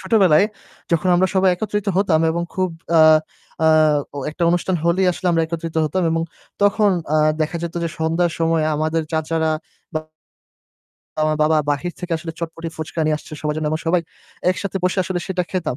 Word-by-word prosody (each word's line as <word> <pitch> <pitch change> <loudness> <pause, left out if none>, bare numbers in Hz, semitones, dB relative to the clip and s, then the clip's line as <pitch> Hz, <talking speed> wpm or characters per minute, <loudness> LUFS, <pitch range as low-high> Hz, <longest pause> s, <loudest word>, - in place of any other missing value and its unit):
ছোটবেলায় 195 -4 +4 0.5
যখন 170 +2 +2
আমরা 185 +2 +4
সবাই 190 0 +4
একত্রিত 210 +2 -3
হতাম 185 -5 +3
এবং 170 +1 -1
খুব, 185 0 0 0.3
আ - - +7 0.6
আ - - +6 0.5
ও - - -4
একটা 165 - -6
অনুষ্ঠান 175 +1 0
হলেই 175 +3 +2
আসলে 180 - -5
আমরা 165 -1 +2
একত্রিত 165 0 -5
হতাম 180 +5 -1
এবং 165 0 0 0.4
তখন, 205 +1 +4 0.2
আ - - +4 0.2
দেখা 155 +2 0
যেত 170 0 -4
যে 170 - 0
সন্ধ্যার 165 +2 +1
সময়ে 165 -1 +2
আমাদের 155 +2 0
চাচারা 160 0 0 0.4
বা 155 - 0 1.2
আমার 155 0 +1
বাবা 155 +1 +3
বাহির 170 +5 -1
থেকে 180 -1 -4
আসলে 165 0 -6
চটপটি, 165 0 -5
ফুচকা 160 +1 -4
নিয়ে 155 - +2
আসছে - - -15
সবার 150 -1 -1
জন্য 155 - -2
এবং 155 +1 -1
সবাই 170 +1 +2 0.5
একসাথে 195 +1 -3
বসে 185 +2 +1
আসলে 180 0 -2
সেটা 185 -2 -1
খেতাম। 175 -9 -2
170 Hz, 180 wpm, -20 LUFS, 160-185 Hz, 1.2 s, আ